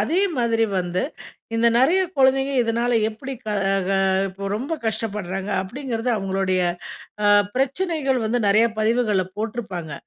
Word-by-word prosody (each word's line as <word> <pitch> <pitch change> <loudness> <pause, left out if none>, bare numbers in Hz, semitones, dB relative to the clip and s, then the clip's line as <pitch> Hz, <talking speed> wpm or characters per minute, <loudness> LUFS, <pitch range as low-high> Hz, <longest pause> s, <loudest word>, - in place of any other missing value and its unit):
அதே 320 - +1 0.2
மாதிரி 230 -1 +2
வந்து 180 0 -1 0.5
இந்த 230 +1 +3
நெறைய 330 +9 +4 0.2
கொழந்தைங்க 270 +1 +3
இதனால 235 +1 0 0.2
எப்பிடி 265 +5 -7
க - - -3 0.4
க - - 0
அ 195 - +2 0.2
இப்போ 195 +1 -8
ரொம்ப 270 +8 -4
கஷ்டப்படுறாங்க. 205 -3 -3
அப்டிங்கிறது 245 +2 -3
அவுங்களுடைய 190 -1 0 0.6
அ - - +5 0.3
பிரச்சனைகள் 275 -1 0
வந்து 240 +2 0
நெறைய 220 +3 +5
பதிவுகள்ல 215 -4 +2
போட்ருப்பாங்க. 210 -8 -4
225 Hz, 130 wpm, -22 LUFS, 195-260 Hz, 0.6 s, அ